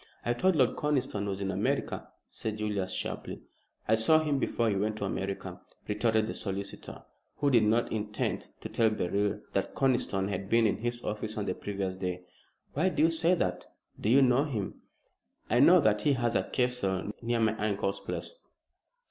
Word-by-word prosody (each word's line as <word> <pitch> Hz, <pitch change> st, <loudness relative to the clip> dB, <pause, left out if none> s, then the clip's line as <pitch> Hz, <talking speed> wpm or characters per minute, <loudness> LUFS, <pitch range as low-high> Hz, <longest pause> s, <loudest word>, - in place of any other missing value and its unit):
"I 120 Hz, -, +2 dB
thought 185 Hz, +9 st, +2 dB
Lord 130 Hz, -5 st, +3 dB
Conniston 130 Hz, -8 st, 0 dB
was 100 Hz, 0 st, -3 dB
in 95 Hz, 0 st, -1 dB
America," 95 Hz, +2 st, -1 dB, 0.2 s
said 110 Hz, -1 st, -4 dB
Julius, 105 Hz, -3 st, -2 dB
sharply. -, -, -5 dB, 0.4 s
"I 110 Hz, -, +3 dB
saw 110 Hz, +8 st, +5 dB
him 150 Hz, -3 st, 0 dB
before 115 Hz, -3 st, 0 dB
he 105 Hz, -, +1 dB
went 105 Hz, +2 st, -1 dB
to 100 Hz, -, -2 dB
America," 95 Hz, -1 st, -4 dB, 0.3 s
retorted 110 Hz, +1 st, +2 dB
the -, -, -4 dB
solicitor, 100 Hz, -1 st, -5 dB, 0.3 s
who 145 Hz, -1 st, +1 dB
did 120 Hz, -3 st, +6 dB
not 115 Hz, +3 st, +2 dB
intend 105 Hz, -1 st, -2 dB
to -, -, -6 dB
tell 115 Hz, -1 st, +3 dB
Beryl 100 Hz, 0 st, -1 dB
that -, -, -1 dB
Conniston 120 Hz, -7 st, +1 dB
had 100 Hz, 0 st, -4 dB
been 115 Hz, 0 st, +4 dB
in 105 Hz, -, +2 dB
his 120 Hz, +1 st, -3 dB
office 110 Hz, +1 st, -4 dB
on 105 Hz, -, -1 dB
the -, -, -1 dB
previous 95 Hz, -2 st, -4 dB
day. 90 Hz, -1 st, -3 dB, 0.5 s
"Why 165 Hz, +7 st, +2 dB
do -, -, +1 dB
you 165 Hz, -, +5 dB
say 165 Hz, +2 st, +2 dB
that? 90 Hz, -, -2 dB, 0.3 s
Do 105 Hz, -, -1 dB
you 135 Hz, +4 st, +6 dB
know 130 Hz, +3 st, +4 dB
him?" 110 Hz, -10 st, -4 dB, 0.7 s
"I 120 Hz, -, +4 dB
know 175 Hz, +7 st, +8 dB
that 105 Hz, -7 st, +2 dB
he 145 Hz, -, +3 dB
has 120 Hz, -3 st, 0 dB
a -, -, +1 dB
castle 105 Hz, -7 st, 0 dB
near 120 Hz, 0 st, 0 dB
my 110 Hz, -1 st, +2 dB
uncle's 100 Hz, -2 st, -1 dB
place." -, -, -4 dB
110 Hz, 185 wpm, -30 LUFS, 100-125 Hz, 0.7 s, know